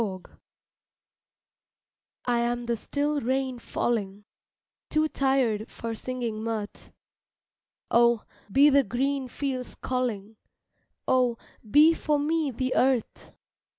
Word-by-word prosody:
MOODS 190 Hz, -4 st, -6 dB, 1.9 s
I 240 Hz, -1 st, +2 dB
AM 240 Hz, 0 st, -1 dB
the 235 Hz, 0 st, 0 dB
still 290 Hz, +5 st, -1 dB
rain 260 Hz, +1 st, -1 dB
falling, 210 Hz, -4 st, -2 dB, 0.6 s
Too 310 Hz, 0 st, +2 dB
tired 265 Hz, -7 st, +1 dB
for 230 Hz, 0 st, -5 dB
singing 235 Hz, -2 st, -4 dB
mirth 220 Hz, -2 st, -5 dB, 1.0 s
Oh, 235 Hz, -1 st, +4 dB, 0.3 s
be 285 Hz, +6 st, +6 dB
the 280 Hz, 0 st, +6 dB
green 265 Hz, +4 st, -1 dB
fields 255 Hz, -1 st, -4 dB
calling, 225 Hz, -5 st, -3 dB, 0.7 s
Oh, 250 Hz, -2 st, +2 dB, 0.3 s
be 305 Hz, +8 st, +7 dB
for 305 Hz, -2 st, 0 dB
me 305 Hz, +1 st, 0 dB
the 255 Hz, +1 st, -2 dB
earth! 255 Hz, -3 st, 0 dB
250 Hz, 105 wpm, -27 LUFS, 230-275 Hz, 1.9 s, be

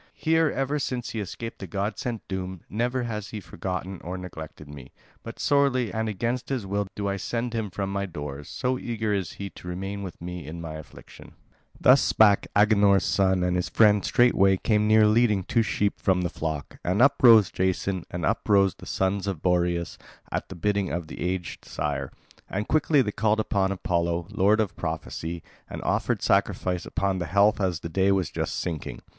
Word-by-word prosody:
Here, 160 Hz, 0 st, +2 dB
ever 140 Hz, +2 st, -1 dB
since 125 Hz, -3 st, -3 dB
he 115 Hz, -, -4 dB
escaped 115 Hz, +3 st, -6 dB
the 95 Hz, -, -6 dB
god 100 Hz, +4 st, -3 dB
sent 120 Hz, -3 st, -4 dB
doom, 95 Hz, -2 st, -5 dB
never 125 Hz, +4 st, -1 dB
has 105 Hz, -3 st, -4 dB
he 110 Hz, -, -5 dB
forgotten 95 Hz, 0 st, -5 dB
or 90 Hz, +2 st, -5 dB
neglected 80 Hz, -4 st, -9 dB
me; 70 Hz, -3 st, -11 dB, 0.3 s
but -, -, -9 dB
sorely 140 Hz, -5 st, +2 dB
and 110 Hz, 0 st, -1 dB
against 120 Hz, +5 st, -2 dB
his 130 Hz, -6 st, -2 dB
will 100 Hz, +1 st, -1 dB
do 100 Hz, -1 st, -2 dB
I 100 Hz, 0 st, -1 dB
send 120 Hz, +4 st, -3 dB
him 110 Hz, -3 st, -2 dB
from 95 Hz, +1 st, -4 dB
my 100 Hz, 0 st, -1 dB
doors, 75 Hz, -4 st, -7 dB
so 125 Hz, 0 st, -1 dB
eager 110 Hz, -3 st, -2 dB
is 95 Hz, -6 st, -2 dB
he 100 Hz, -1 st, -7 dB
to -, -, -12 dB
remain 95 Hz, +3 st, -4 dB
with 95 Hz, -3 st, -7 dB
me 90 Hz, -3 st, -7 dB
in 85 Hz, +2 st, -7 dB
my 80 Hz, -2 st, -6 dB
affliction." 80 Hz, -2 st, -12 dB, 0.5 s
Thus -, -, +6 dB
spake 105 Hz, -2 st, +4 dB
Agenor's 100 Hz, -2 st, +4 dB
son; 95 Hz, -2 st, +2 dB
and 90 Hz, 0 st, +1 dB
his 90 Hz, 0 st, -1 dB
friend 105 Hz, -3 st, +4 dB
straightway 100 Hz, -6 st, +4 dB
came 105 Hz, +1 st, +1 dB
near 110 Hz, 0 st, +6 dB
leading 105 Hz, -2 st, +3 dB
two 115 Hz, -, +1 dB
sheep 105 Hz, -1 st, -1 dB
from 95 Hz, -2 st, +2 dB
the 85 Hz, -, 0 dB
flock. 80 Hz, -3 st, -5 dB
And 90 Hz, +3 st, 0 dB
up 140 Hz, +3 st, +4 dB
rose 115 Hz, -6 st, +7 dB
Jason 95 Hz, 0 st, -1 dB
and 85 Hz, -3 st, -3 dB
up -, -, -1 dB
rose 100 Hz, -2 st, +5 dB
the -, -, -13 dB
sons 95 Hz, +1 st, -1 dB
of 95 Hz, -6 st, -3 dB
Boreas 85 Hz, -2 st, 0 dB, 0.3 s
at -, -, -3 dB
the -, -, -7 dB
bidding 100 Hz, +1 st, 0 dB
of 85 Hz, -2 st, -4 dB
the -, -, -8 dB
aged 90 Hz, -1 st, -3 dB
sire. 70 Hz, -3 st, -3 dB, 0.4 s
And 105 Hz, +2 st, -3 dB
quickly 150 Hz, -2 st, +3 dB
they 105 Hz, -, -2 dB
called 110 Hz, +1 st, +1 dB
upon 100 Hz, -3 st, +1 dB
Apollo, 85 Hz, -2 st, -1 dB
lord 105 Hz, +1 st, +3 dB
of 105 Hz, -2 st, -1 dB
prophecy, 80 Hz, 0 st, -4 dB, 0.3 s
and -, -, -6 dB
offered -, -, 0 dB
sacrifice 90 Hz, -1 st, +1 dB
upon 95 Hz, -1 st, -1 dB
the 90 Hz, -, -3 dB
health 100 Hz, +4 st, +3 dB
as 90 Hz, -4 st, 0 dB
the -, -, -4 dB
day 95 Hz, +3 st, +2 dB
was 95 Hz, -4 st, 0 dB
just -, -, -3 dB
sinking. 80 Hz, -4 st, -5 dB
100 Hz, 195 wpm, -26 LUFS, 90-110 Hz, 0.5 s, rose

